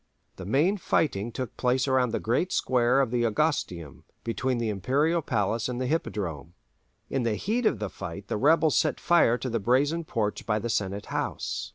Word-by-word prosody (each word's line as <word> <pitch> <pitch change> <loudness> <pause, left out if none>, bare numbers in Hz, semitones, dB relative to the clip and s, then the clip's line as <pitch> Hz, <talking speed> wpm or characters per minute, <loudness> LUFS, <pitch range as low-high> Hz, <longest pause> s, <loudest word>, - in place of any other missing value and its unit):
The 95 - -7
main 155 - +2
fighting 120 - 0
took 130 +1 -5
place 130 +1 +1
around 130 -2 +2
the - - -2
great 125 +11 0
square 125 +1 +2
of 130 -4 -1
the 120 -1 +1
Augustaeum, 105 - -1 0.2
between 125 +2 -1
the 115 -2 -1
Imperial 140 - +1
palace 115 -2 -1
and 125 0 -3
the 130 - -1
Hippodrome. 90 - -3 0.6
In 135 - 0
the 115 -3 0
heat 225 - 0
of 135 - +1
the 105 0 -3
fight 95 0 -8
the - - -2
rebels 155 +5 +4
set - - +1
fire 170 -9 +4
to 130 - -5
the 115 -2 -1
Brazen 140 +9 +1
Porch 110 -8 -2
by 105 -1 0
the 115 +2 -3
Senate 100 -1 -2
House. - - -3
120 Hz, 190 wpm, -27 LUFS, 105-140 Hz, 0.6 s, rebels